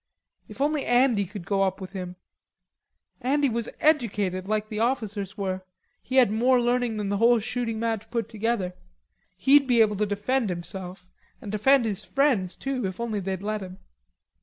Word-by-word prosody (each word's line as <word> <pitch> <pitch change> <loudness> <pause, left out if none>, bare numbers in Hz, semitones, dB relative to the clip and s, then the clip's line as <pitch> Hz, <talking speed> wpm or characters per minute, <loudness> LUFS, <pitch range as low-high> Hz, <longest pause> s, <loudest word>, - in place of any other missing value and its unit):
If - - -9
only 295 0 +1
Andy 245 -4 +3
could 195 -1 -9
go 195 +3 0
up 190 0 0
with 190 -1 -8
him, 180 -2 -6 1.1
Andy 280 +2 +2
was 235 0 -2
educated, 205 - +1
like 215 0 -1
the 215 -2 -4
officers 215 -5 -2
were; 190 -2 -2 0.4
he 260 - -5
had 250 -6 +6
more 245 +4 +3
learning 240 -2 0
than 205 -2 -2
the 200 - 0
whole 235 +3 +5
shooting 225 0 -2
match 225 -2 -2
put 230 -3 -2
together. 220 -4 -2 0.6
He'd 275 +8 +5
be 245 -2 +3
able 210 -2 +4
to 210 +1 +1
defend 210 +4 0
himself, 180 +1 -6 0.3
and 205 - -7
defend 245 +4 +4
his 210 -2 -2
friends, 250 -10 +1
too, 260 -6 -2
if 185 +2 -7
only 230 -3 -2
they'd 190 0 -4
let 215 0 -2
him. 185 -1 -8
215 Hz, 175 wpm, -26 LUFS, 195-245 Hz, 1.1 s, had